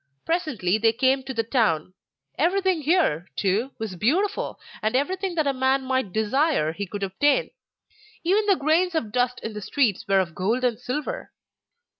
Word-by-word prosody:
Presently 260 - 0
they 225 0 +3
came 260 +3 +2
to 270 - -4
the 230 -3 -1
town; 210 - +1 0.4
everything 375 -1 +1
here, 300 - +1
too, 205 +6 0
was 220 -4 -5
beautiful, 365 - 0 0.2
and 215 +3 0
everything 370 +6 -1
that 315 -2 +1
a 280 - +1
man 265 +1 +1
might 260 -6 -1
desire 220 - +1
he 200 +3 -5
could 200 +2 -5
obtain. 290 - +1 0.7
Even 405 +5 +2
the 395 - +5
grains 335 +4 +1
of 225 -10 -1
dust 250 +1 0
in 220 - -4
the 210 - -6
streets 230 -3 0
were 195 0 +4
of 175 -3 -1
gold 220 +9 -1
and 240 -3 +1
silver. 300 - -4
255 Hz, 170 wpm, -24 LUFS, 210-320 Hz, 0.7 s, the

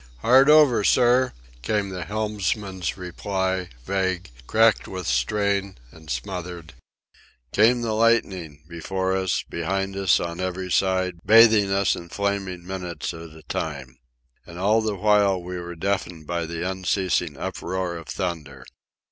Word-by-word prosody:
"Hard 130 - +6
over, 150 -8 +6
sir," 125 +3 +4 0.3
came 100 +9 -1
the 90 -2 -5
helmsman's 105 -3 -2
reply, 95 0 -2 0.2
vague, 95 -5 -1 0.2
cracked 110 0 +3
with 95 -2 -6
strain, 100 +10 0
and 80 -1 -15
smothered. 90 -3 -5 0.8
Came 120 +3 +4
the 110 -2 -1
lightning, 95 -10 +1
before 95 +3 -2
us, 95 -2 0
behind 95 +3 -2
us, 95 -2 +3
on 85 0 -4
every 95 0 -3
side, 95 0 +1
bathing 110 -3 +6
us 100 -1 +2
in 85 0 -9
flaming 100 -2 -3
minutes 90 -5 -5
at 80 0 -9
a 80 0 -15
time. 70 -5 -5 0.4
And 85 - -12
all 105 +5 +3
the 110 -2 -2
while 100 -1 +3
we 90 0 -6
were 85 0 -7
deafened 90 -3 -3
by 85 0 -3
the 85 +2 -3
unceasing 95 -1 -1
uproar 90 -1 -3
of 85 -2 -9
thunder. 75 -8 -5
95 Hz, 140 wpm, -24 LUFS, 85-100 Hz, 0.8 s, Hard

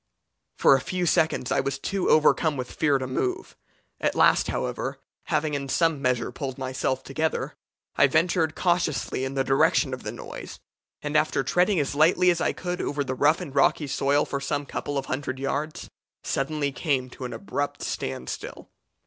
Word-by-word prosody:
For - - +6
a 135 - 0
few 180 +6 -2
seconds 160 -6 +1
I - - +2
was 135 0 -1
too 195 +6 -1
overcome 155 0 +4
with 125 -1 -5
fear 145 -3 +2
to 130 - -4
move. 370 - -2 0.4
At - - 0
last, - - +4
however, - - -3 0.3
having 155 -2 0
in 140 -1 -3
some 165 -1 +2
measure 125 -2 0
pulled 135 -1 -5
myself 130 0 -2
together, 155 +3 -2 0.4
I 140 - +6
ventured 160 +2 +1
cautiously 175 -7 0
in 135 +1 -4
the 135 - +2
direction 135 +1 +3
of - - -5
the - - -5
noise, - - -9 0.4
and 145 0 -3
after 150 -2 +2
treading 180 +7 +2
as 145 -1 -1
lightly 170 +5 +4
as 170 -1 -1
I - - +2
could 180 0 -4
over 145 0 -1
the 130 - -3
rough 150 +6 +3
and 155 -7 -7
rocky 140 +2 +3
soil 140 +1 +1
for 140 - -3
some 145 +1 -2
couple 145 +1 -4
of 135 - -2
hundred 130 0 -3
yards, 145 +3 -3 0.4
suddenly 145 0 -1
came 135 -3 -1
to 130 - -7
an 125 - -5
abrupt 145 -7 -3
standstill. 65 - -5
145 Hz, 180 wpm, -26 LUFS, 135-160 Hz, 0.4 s, For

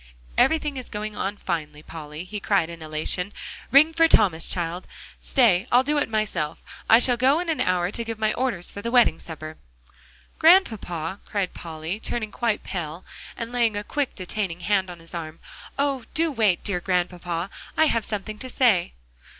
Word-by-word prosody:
"Everything 300 -3 +2
is 255 - -7
going 210 0 -5
on 200 +2 -3
finely, 155 -5 -4
Polly," 155 0 -8
he 210 +3 -6
cried 190 -5 +1
in 165 -1 -10
elation. 155 +5 -1 0.4
"Ring 305 +4 +6
for 330 0 +5
Thomas, 165 - +3
child; 175 0 -2 0.3
stay, 220 -9 +3
I'll 245 +2 +6
do 295 +2 +1
it - - -1
myself. 205 -9 -1 0.3
I 225 - +9
shall 245 0 +4
go 265 +6 +4
in 355 -1 -3
an 320 - 0
hour 180 0 +1
to 235 - -1
give 225 -1 -5
my 215 0 +1
orders 240 -9 -1
for 200 - -7
the 235 - -3
wedding 240 -9 +4
supper." 155 -1 -8 0.8
"Grandpapa," 205 - +3
cried 200 -4 -2
Polly, 165 +4 -5
turning 220 -2 -3
quite 235 -3 -1
pale, 170 -2 -5 0.3
and 230 0 -5
laying 235 -4 +1
a 205 - -3
quick, 285 +4 -2
detaining 185 -2 -3
hand 190 -1 +1
on 175 - -8
his 165 +1 -13
arm, 165 -2 -6 0.4
"oh! 275 -3 0
do 330 0 +2
wait, 215 -9 +2
dear 200 -4 -1
Grandpapa, 175 0 -2 0.3
I 315 - +6
have 230 -7 +1
something 210 +1 -4
to 255 - -6
say." 230 - +2
205 Hz, 180 wpm, -24 LUFS, 175-240 Hz, 0.8 s, I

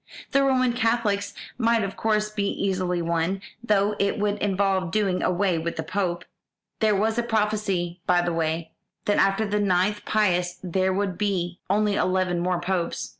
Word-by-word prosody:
The 275 - +4
Roman 255 -2 +2
Catholics 225 -4 0 0.2
might 230 -2 +3
of 195 0 -4
course 210 -1 0
be 205 -1 -1
easily 185 -3 -1
won, 170 +3 0 0.2
though 210 -2 +2
it 200 +2 +1
would 205 0 0
involve 195 -2 +1
doing 195 -1 0
away 185 -1 +1
with 170 +1 -3
the 160 - -3
Pope. 175 0 -2 0.5
There 215 -2 +3
was 220 +3 +1
a - - +3
prophecy, 210 -6 -1
by 175 -1 +4
the 175 -1 -1
way, 160 0 -2 0.3
that 205 - +2
after 195 +3 +3
the 210 0 0
ninth 200 +1 +1
Pius 180 -4 +1
there 185 +1 +1
would 190 -1 -2
be 180 -4 -1
only 210 +1 +2
eleven 185 -2 +1
more 180 0 0
Popes. 175 -1 -2
195 Hz, 170 wpm, -25 LUFS, 180-210 Hz, 0.5 s, The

